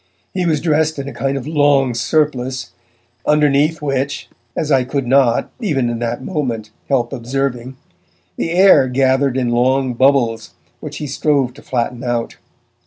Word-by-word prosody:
He 180 Hz, -2 st, -1 dB
was 155 Hz, -3 st, +1 dB
dressed 155 Hz, -1 st, +1 dB
in 140 Hz, 0 st, -5 dB
a -, -, -6 dB
kind 135 Hz, 0 st, -2 dB
of 130 Hz, -, -6 dB
long 145 Hz, -4 st, +2 dB
surplice, 130 Hz, -2 st, -1 dB, 0.5 s
underneath 150 Hz, +1 st, +2 dB
which 140 Hz, 0 st, -2 dB, 0.3 s
as 150 Hz, -, -1 dB
I 135 Hz, -2 st, +4 dB
could 135 Hz, +1 st, -2 dB
not, 125 Hz, -2 st, +2 dB
even 135 Hz, -, 0 dB
in 115 Hz, -, -4 dB
that 120 Hz, +1 st, -3 dB
moment, 120 Hz, -, -3 dB, 0.2 s
help 130 Hz, -2 st, 0 dB
observing 130 Hz, 0 st, -3 dB, 0.6 s
the 165 Hz, -, -2 dB
air 180 Hz, -6 st, +5 dB
gathered 130 Hz, +1 st, +1 dB
in 125 Hz, -2 st, 0 dB
long 130 Hz, +2 st, +1 dB
bubbles 120 Hz, -4 st, +1 dB, 0.2 s
which -, -, -7 dB
he 150 Hz, -, -5 dB
strove 140 Hz, -2 st, 0 dB
to -, -, -15 dB
flatten 125 Hz, 0 st, -3 dB
out. 120 Hz, -2 st, -2 dB
135 Hz, 155 wpm, -18 LUFS, 125-145 Hz, 0.6 s, air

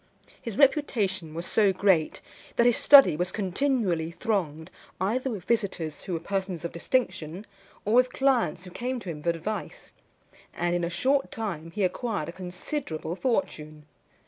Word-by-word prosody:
His 230 Hz, -4 st, -6 dB
reputation 210 Hz, -, +1 dB
was 170 Hz, +1 st, -4 dB
so 205 Hz, 0 st, +3 dB
great, 185 Hz, -4 st, +1 dB, 0.3 s
that 235 Hz, -, +3 dB
his 240 Hz, -2 st, +5 dB
study 275 Hz, -, +8 dB
was 180 Hz, +3 st, -2 dB
continually 195 Hz, -, 0 dB
thronged 170 Hz, -6 st, -2 dB, 0.3 s
either 245 Hz, +8 st, 0 dB
with 210 Hz, -7 st, -5 dB
visitors 185 Hz, -9 st, -1 dB
who 190 Hz, -, -5 dB
were 165 Hz, -, -1 dB
persons 190 Hz, -1 st, -3 dB
of 170 Hz, -, -3 dB
distinction, 180 Hz, -3 st, -2 dB, 0.4 s
or 210 Hz, -, 0 dB
with 250 Hz, +1 st, +5 dB
clients 255 Hz, -, +1 dB
who 180 Hz, -, -9 dB
came 250 Hz, +6 st, -3 dB
to 180 Hz, -, -5 dB
him 150 Hz, -2 st, -8 dB
for 170 Hz, -, 0 dB
advice; 170 Hz, +2 st, -4 dB, 0.6 s
and 175 Hz, 0 st, 0 dB
in 175 Hz, 0 st, 0 dB
a 170 Hz, -, 0 dB
short 270 Hz, +10 st, +1 dB
time 175 Hz, -8 st, -4 dB
he 200 Hz, +4 st, -2 dB
acquired 190 Hz, -3 st, -1 dB
a -, -, -4 dB
considerable 180 Hz, -, -5 dB
fortune. 155 Hz, -, -2 dB
190 Hz, 160 wpm, -27 LUFS, 170-235 Hz, 0.6 s, study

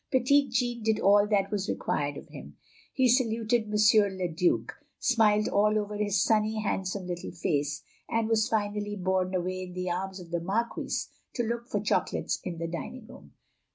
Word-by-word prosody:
Petit 275 Hz, +2 st, +3 dB
Jean 240 Hz, 0 st, -1 dB
did 220 Hz, -1 st, +1 dB
all 205 Hz, +1 st, +5 dB
that 200 Hz, -1 st, +1 dB
was 205 Hz, 0 st, -2 dB
required -, -, -1 dB
of -, -, -11 dB
him; -, -, -11 dB, 0.3 s
he 260 Hz, -1 st, +3 dB
saluted 230 Hz, -2 st, +2 dB
M. -, -, -1 dB, 0.4 s
le 185 Hz, -1 st, -1 dB
Due; 165 Hz, +2 st, +1 dB, 0.3 s
smiled 215 Hz, -4 st, +3 dB
all 210 Hz, +1 st, +3 dB
over 210 Hz, 0 st, -2 dB
his 205 Hz, -2 st, +1 dB
sunny, 215 Hz, 0 st, +2 dB
handsome, 190 Hz, -2 st, -2 dB
little 175 Hz, -1 st, -5 dB
face; 145 Hz, -3 st, -1 dB, 0.3 s
and 225 Hz, -1 st, 0 dB
was 220 Hz, -1 st, +2 dB
finally 205 Hz, -1 st, -1 dB
borne 185 Hz, -1 st, 0 dB
away 185 Hz, +1 st, -2 dB
in 180 Hz, -1 st, -7 dB
the 180 Hz, 0 st, -3 dB
arms 190 Hz, +2 st, -3 dB
of 170 Hz, -2 st, -12 dB
the 170 Hz, -1 st, -1 dB
Marquise 215 Hz, +7 st, -2 dB, 0.2 s
to 240 Hz, -, 0 dB
look 235 Hz, +1 st, -3 dB
for -, -, 0 dB
chocolates -, -, 0 dB
in 175 Hz, -2 st, -5 dB
the 165 Hz, 0 st, -3 dB
dining 215 Hz, +8 st, -6 dB
room. -, -, -15 dB
205 Hz, 180 wpm, -28 LUFS, 185-225 Hz, 0.4 s, all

